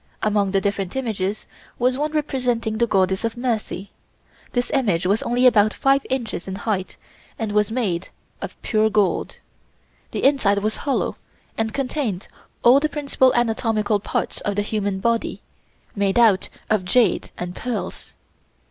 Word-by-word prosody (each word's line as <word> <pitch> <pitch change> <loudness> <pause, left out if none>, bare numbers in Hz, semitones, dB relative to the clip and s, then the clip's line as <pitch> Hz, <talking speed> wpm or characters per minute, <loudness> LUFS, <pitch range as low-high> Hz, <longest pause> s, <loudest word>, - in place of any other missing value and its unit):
Among 205 -2 +2
the 195 0 +2
different 200 -1 -2
images 215 -6 -2 0.3
was 250 +1 +2
one 295 +3 -1
representing 250 -7 -1
the 235 - +3
Goddess 190 -1 +1
of 230 +1 -2
Mercy. 225 -5 -2 0.6
This 245 0 -1
image 200 -11 +1
was 200 +4 +2
only 245 +2 +1
about 215 -4 +5
five 275 0 +3
inches 235 -8 -3
in 190 - -4
height 195 -2 -3 0.4
and 220 -2 -2
was 210 0 +2
made 195 -8 -1 0.3
of - - -7
pure 220 0 +2
gold. 205 -3 +1 0.7
The - - -4
inside 265 -8 +4
was 215 +2 0
hollow 275 - -1 0.4
and 225 0 -1
contained 250 -7 -2 0.4
all 250 +3 +7
the 305 +1 0
principal 280 -3 +2
anatomical 225 -2 +1
parts - - -3
of 205 - -2
the 205 - +1
human 205 -2 -2
body, 230 +1 -1 0.5
made 200 0 +1
out 220 -5 +4 0.2
of 215 -3 +1
jade 235 +5 +2
and 180 0 -5
pearls. 245 -1 -5
220 Hz, 150 wpm, -22 LUFS, 200-250 Hz, 0.7 s, all